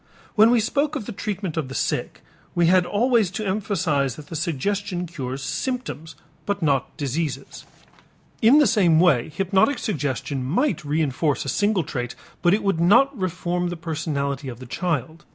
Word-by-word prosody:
When 220 +1 +6
we 240 0 +4
spoke 280 +7 0
of 265 - -4
the 235 - -5
treatment 195 -4 -4
of 155 -5 -1
the 130 - -8
sick, - - -2 0.3
we 175 -1 +3
had 180 +1 +4
always 230 -2 +2
to 205 +4 -4
emphasize 185 - 0
that 150 - -12
the 165 - -6
suggestion 180 +4 -2
cures 135 -5 -5
symptoms 160 - -4 0.3
but 200 -3 -1
not 140 -4 0
diseases. 140 -1 -3 0.8
In 240 +5 +7
the 300 - +6
same 190 -8 +4
way 155 -9 +3
hypnotic 195 - +2
suggestion 140 - -2
might 185 - +1
reënforce 150 -1 0
a - - -2
single 205 - +1
trait 125 -5 -4 0.3
but 180 +4 +4
would 195 -5 +1
not 240 +11 +5
reform 180 -2 -2
the 175 - -5
personality 145 -4 -3
of 120 - -7
the 130 - -10
child. 160 +2 -3
175 Hz, 165 wpm, -23 LUFS, 145-205 Hz, 0.8 s, In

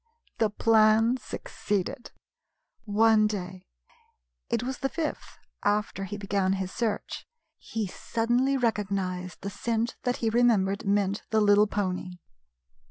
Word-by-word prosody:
The 220 - +3
plan 220 +2 +4
succeeded. 205 -2 -4 0.8
One 215 0 +4
day, 185 -3 -6 0.8
it 235 0 0
was 260 +1 -4
the 270 - -1
fifth 320 0 -4 0.2
after 205 -1 0
he 205 +2 -6
began 195 -1 0
his 190 -1 -3
search, 220 -3 -3 0.3
he 225 -2 -3
suddenly 240 +7 0
recognized 195 -6 -2
the 200 - -4
scent 230 +3 -2
that 245 -1 -1
he 225 -1 0
remembered 215 -4 +2
meant 200 0 +1
the 220 - +2
little 205 0 +5
pony. 185 -3 -2
210 Hz, 120 wpm, -27 LUFS, 195-230 Hz, 0.8 s, little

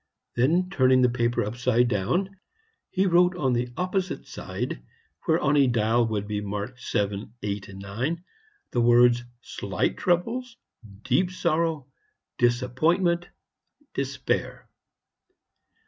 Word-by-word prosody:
Then, 160 +10 +3
turning 130 -6 +4
the 125 - +4
paper 120 -1 +1
upside 120 +2 +1
down, 175 - -1 0.5
he 190 0 +1
wrote 180 0 +4
on 130 -6 +1
the 120 +1 0
opposite 185 +1 -2
side, - - -5 0.4
where 165 -1 +3
on 150 -2 +2
a 140 -2 +5
dial 115 0 +2
would 105 -2 -2
be 105 -1 -2
marked 105 +5 -5
VII, 100 +1 -1
VIII, 100 -1 -3
IX, 100 - -4 0.5
the 120 - +1
words 120 0 +5 0.2
Slight - - -2
Troubles 230 +8 -1 0.5
Deep 135 +8 +2
Sorrow, 165 -5 0 0.5
Disappointment 155 +9 +2 0.7
Despair. - - -2
125 Hz, 115 wpm, -26 LUFS, 120-175 Hz, 0.7 s, a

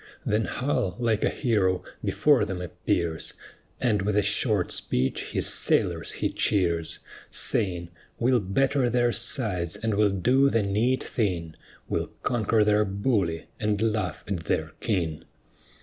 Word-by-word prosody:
Then 105 +1 +1
Hull, 120 -8 -1
like 115 -3 +1
a - - +3
hero, 100 -8 +1 0.2
before 145 -6 +3
them 95 -3 -3
appears, 85 -1 -2 0.4
And 110 -6 +2
with 100 +1 0
a 105 - +4
short - - +2
speech 65 +1 -1
his - - -2
sailors - - +1
he - - -1
cheers, 85 -5 0 0.3
Saying, 85 -3 0 0.3
"We'll 125 +1 +3
batter 130 +6 +1
their 120 0 +2
sides, 110 - -1
and 110 -1 -2
we'll 105 0 +3
do 125 +9 +3
the 115 -5 +1
neat 110 +6 +1
thing: 90 -8 -2 0.3
We'll - - -1 0.2
conquer 110 -2 +2
their 105 0 +3
bully, 100 -5 0
and 105 -1 0
laugh 105 -7 -1
at 95 -5 -3
their - - -1
king." 85 -8 -1
105 Hz, 140 wpm, -26 LUFS, 90-120 Hz, 0.4 s, a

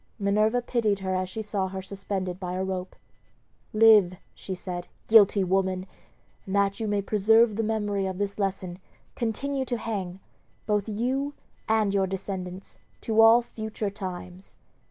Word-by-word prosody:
Minerva 215 +3 +2
pitied 225 -5 +1
her 190 -1 -2
as 185 0 -1
she 220 +3 -5
saw 200 -2 -2
her 190 0 -6
suspended 190 -2 -4
by 180 -2 -4
a 185 - -1
rope. 185 -1 -4 0.8
"Live," 215 -4 +6 0.2
she 190 - -6
said, 180 -1 -6 0.2
"guilty 205 -3 +6
woman! 185 0 0 0.6
and 190 - -2
that 200 +1 +1
you 220 - -2
may 205 -1 0
preserve 220 +2 +4
the 225 - 0
memory 205 -3 -1
of 190 -1 -4
this 200 +1 -2
lesson, 190 -2 -2 0.4
continue 265 +4 -2
to 245 -2 -2
hang, 195 -5 -4 0.5
both 210 0 0
you 260 +7 -1 0.3
and 215 -2 +2
your 195 -1 +2
descendants, 190 -1 -6 0.2
to 225 0 +3
all 225 +2 +7
future 220 -3 -5
times." 185 -1 -8
200 Hz, 155 wpm, -26 LUFS, 190-220 Hz, 0.8 s, all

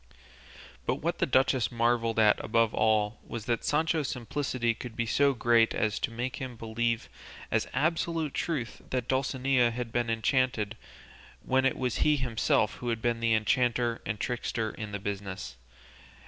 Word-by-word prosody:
But - - +2
what - - -2
the - - +2
duchess 130 -2 +2
marvelled 115 -1 +1
at 110 -2 +4
above 115 0 +2
all 110 0 +2
was 115 -3 -6
that 120 -2 -1
Sancho's 155 -1 +1
simplicity 125 -1 -1
could 115 0 -8
be 120 - -1
so 140 +4 +3
great 115 -1 +3
as 105 -2 0
to - - -1
make 120 +2 -4
him 130 -2 -6
believe 115 +1 -1 0.4
as - - +1
absolute 160 +1 0
truth 140 -9 -3
that 125 -2 -2
Dulcinea 130 -1 +2
had 120 0 -5
been 120 -1 0
enchanted, 115 -2 +1 0.7
when 130 0 +2
it 135 - +2
was 125 -3 -1
he 150 - +3
himself 115 -4 +1
who 120 - -4
had 115 -1 -1
been 120 -1 +1
the 115 -1 +2
enchanter 120 +2 +1
and 110 -2 -3
trickster 115 -2 -2
in 105 -1 -7
the 100 - -2
business. 95 -8 -5
120 Hz, 160 wpm, -29 LUFS, 115-130 Hz, 0.7 s, at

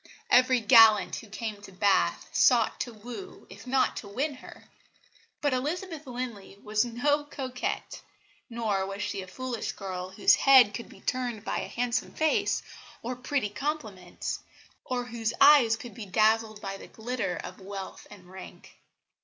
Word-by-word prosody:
Every 255 -1 +5
gallant 220 -2 +6
who 225 - -10
came 215 -1 -5
to 205 - -12
Bath, 185 - +1
sought 240 -3 +3
to 245 - -3
woo, 240 - -10
if - - -12
not 260 +1 +2
to 205 - -6
win, 275 +9 -2
her. - - -13 0.8
But 290 -2 +1
Elizabeth 310 +3 -3
Linley 240 -6 -6
was 215 0 +1
no 285 +5 0
coquette; 260 -3 -5 0.5
nor 220 -5 -1
was 195 +1 -5
she 200 -1 -3
a 185 - -9
foolish 255 +3 -4
girl 185 -2 -6
whose 190 - +4
head 260 -6 +6
could 235 - -7
be - - -15
turned 245 -4 -3
by - - -1
a - - -4
handsome 240 -1 -2
face 315 -1 +1 0.4
or 250 +2 -3
pretty 255 -2 -1
compliments, 210 - -4 0.4
or 250 -1 -2
whose 230 -2 -3
eyes 275 -6 +7
could 235 0 -10
be 220 -4 -8
dazzled 215 +2 +2
by 195 -1 -5
the - - -12
glitter 230 -5 -3
of - - -8
wealth 195 0 -8
and 195 -3 -14
rank. 190 0 -12
230 Hz, 160 wpm, -28 LUFS, 205-255 Hz, 0.8 s, eyes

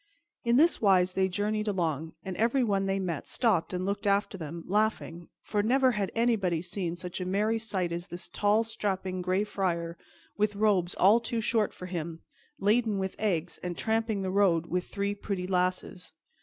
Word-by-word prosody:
In 235 -1 +3
this 325 +6 +4
wise 185 -3 +4
they 190 0 +2
journeyed 210 +3 -1
along, 160 -5 -1
and 190 -1 -4
everyone 225 -4 +2
they 195 0 +1
met 175 -6 -3
stopped 220 -9 +1
and 180 0 -2
looked 200 +2 -2
after 200 0 +2
them, 165 -1 -6
laughing, 200 -4 -1
for 210 - 0
never 260 +4 +3
had 205 -4 -2
anybody 220 -8 +2
seen 175 -1 -3
such 180 +1 -6
a - - 0
merry 210 +4 +1
sight 195 -6 -2
as 170 +2 -4
this 175 -1 -6
tall, 210 +2 +2
strapping 190 -4 -2
Gray 185 +3 +1
Friar, 170 -5 -2 0.4
with 210 0 +1
robes 200 -4 +2
all 205 +5 +5
too 235 0 -2
short 220 -1 +1
for 180 - -9
him, 170 -2 -5 0.3
laden 215 +1 +2
with 190 -1 -3
eggs, 180 -5 -1
and 175 -1 -4
tramping 220 -2 0
the 185 - -2
road 185 -4 +3
with 180 +1 -2
three 200 0 -2
pretty 200 -2 -4
lasses. 185 0 -1
195 Hz, 180 wpm, -29 LUFS, 180-215 Hz, 0.4 s, all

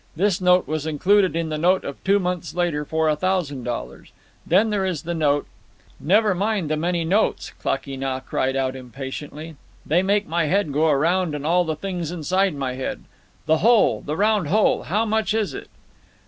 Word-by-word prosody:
This 190 +2 +1
note 180 -2 +4
was 155 +1 -3
included 185 +4 +2
in 165 -1 -1
the 155 -1 -3
note 180 +4 +3
of 140 - -7
two 200 +1 +3
months 180 -3 -3
later 175 -4 0
for 160 +1 0
a 155 - +2
thousand 155 -6 -1
dollars. 120 -1 -6 0.4
Then 205 +6 +3
there 205 -2 0
is 180 -5 -2
the 170 +1 -3
note—" 145 -3 +1 0.5
"Never 205 +5 +3
mind 195 -4 -1
the - - +2
many 170 +1 -1
notes!" 200 +6 0
Klakee 135 0 -2
Nah 135 -1 -2
cried 130 0 -2
out 130 -1 -1
impatiently. 135 +5 -8 0.3
"They 170 +4 +2
make 200 +2 +1
my 165 0 0
head 170 -2 0
go 155 +3 +2
around 165 +3 +1
and 145 0 -5
all 175 +2 +3
the 160 -1 -2
things 175 -1 -4
inside 180 +2 0
my 135 -2 -3
head. 130 +1 -5 0.4
The 160 0 +2
whole! 230 0 +4
The 150 +2 -4
round 210 -4 +2
whole! 210 +7 +2
How 210 +7 0
much 220 0 0
is 220 -2 -1
it?" - - -8
170 Hz, 190 wpm, -22 LUFS, 150-190 Hz, 0.5 s, note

